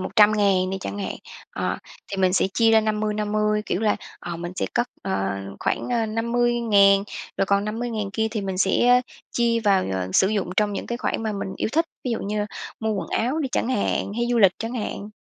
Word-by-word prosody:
100.000 200 -2 +3
đi 190 - -2
chẳng 205 - -5
hạn. 195 - -3 0.4
Ờ, - - -2 0.3
thì 195 - -4
mình 185 -1 +3
sẽ 190 - +3
chia 225 -1 +4
ra 220 0 +6
50-50, 210 0 0
kiểu 185 - -1
là, 215 -2 +2 0.2
ờ, 175 -1 -5
mình 175 +1 -5
sẽ - - 0
cất, 240 - +1
ờ, 100 - -1 0.2
khoảng, - - -1
ơ, 235 -2 +1
50.000 225 -3 +3 0.3
rồi 195 - +1
còn 200 0 +2
50.000 220 -2 -3
kia 220 0 0
thì 220 -2 -2
mình 190 -2 -3
sẽ, 195 +5 +3
ơ, 250 0 +7 0.3
chia 235 -1 +2
vào, 200 -4 +3
ờ, 95 -1 -2
sử 190 - +4
dụng 205 -4 -1
trong 210 -1 +2
những - - -4
cái 240 0 -3
khoản - - -2
mà 220 -1 -1
mình 195 -1 -4
yêu - - -1
thích, 330 +3 +2 0.2
ví 250 - -1
dụ 230 - 0
như 210 +1 -2 0.3
mua 220 0 0
quần 195 - -3
áo 250 +7 0
đi 285 -4 -1
chẳng - - 0
hạn, 205 -4 0
hay 235 +1 0
du 240 - +2
lịch 195 -4 +6
chẳng 230 +2 -4
hạn. 210 -2 -4
210 Hz, 220 wpm, -24 LUFS, 195-230 Hz, 0.4 s, ơ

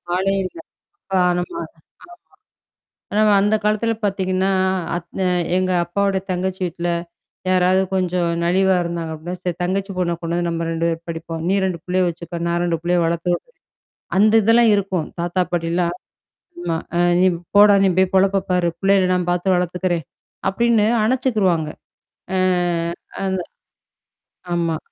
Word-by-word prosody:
ஆளே 195 +2 +1
இல்ல. 185 - -7 0.5
ப - - -11 0.3
நம்ம. 175 - -4
ஆமா. - - -3 1.5
ஆனா 210 +1 +2 0.2
அந்த 205 +2 +2
காலத்துல 215 +2 +1
பாத்தீங்கன்னா, 190 -1 0 0.5
அத் 175 +2 -7
அ - - +2 0.3
எங்க 185 0 +1
அப்பாாவோட 195 +2 0
தங்கச்சி 185 +1 -2
வீட்ல, 175 0 -2 0.6
யாராவது 185 +1 +3
கொஞ்சம் 180 -2 0
நலிவா 190 +2 +3
இருந்தாங்க 170 -1 -4
அப்பிடின்னா, 175 +3 -7
சரி 180 -2 -2
தங்கச்சி 195 +2 -1
பொண்ண 175 -1 0
கொண்டு 170 0 -3
வந்து 175 0 -1
நம்ம 165 0 -2
2 165 0 -1
பேரும் 165 0 -5
படிப்போம். 165 0 -5
நீ 190 - +2
2 185 -3 -1
புள்ளைய 185 0 +1
வச்சுக்க. 170 0 -6
நான் 170 0 0
2 170 -1 0
புள்ளைய 175 0 +2
வளர்த்த 170 +2 0
விட்றேன். 485 - -9 0.6
அந்த 215 +2 +5
இதெல்லாம் 230 +1 +5
இருக்கும். 190 -5 -1
தாத்தா 175 +2 0
பாட்டிலாம் 170 0 0 0.7
ஆமா. 170 -2 -1 0.2
அ - - +2 0.2
"நீ 185 - +5 0.3
போடா! 205 0 +8
நீ - - +4
போய் 190 -1 +3
பொழப்ப 195 0 +3
பாரு! 180 -1 +2
புள்ளைகள 195 -1 +3
நான் 180 -1 -1
பார்த்து 180 +2 +1
வளர்த்துக்கிறேன்" 180 -1 -1 0.5
அப்பிடின்னு 230 +1 +2 0.2
அணைச்சுக்கிருவாங்க. 215 - +1 0.7
ஆ - - +1 0.9
அந்த 190 -1 -1 1.2
ஆமா. 165 -2 0
180 Hz, 145 wpm, -20 LUFS, 170-195 Hz, 1.5 s, போடா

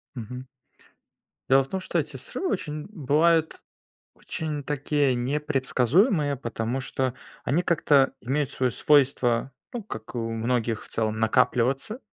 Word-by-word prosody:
Мгм. 125 +2 -7 1.0
Дело 135 +1 +6
в - - -12
том, 190 - -2
что 180 -2 -1
эти 150 -2 -4
срывы 365 - -4
очень- 150 -5 -3
бывают- 160 0 +2 0.6
очень 150 -2 -4
такие 145 -1 +1
непредсказуемые, 145 - +2
потому 120 0 -3
что 130 -1 -1 0.3
они 155 +8 +1
как-то 145 -6 +3
имеют 140 +3 -1
свое 130 -1 0
свойство, 130 -4 +2 0.2
ну, 240 -3 -4
как 110 - -8
и - - -2
у 115 -1 -2
многих 115 -1 -1
в - - -13
целом, 110 -1 -2
накапливаться. 125 - +1
135 Hz, 135 wpm, -26 LUFS, 120-150 Hz, 1.0 s, Дело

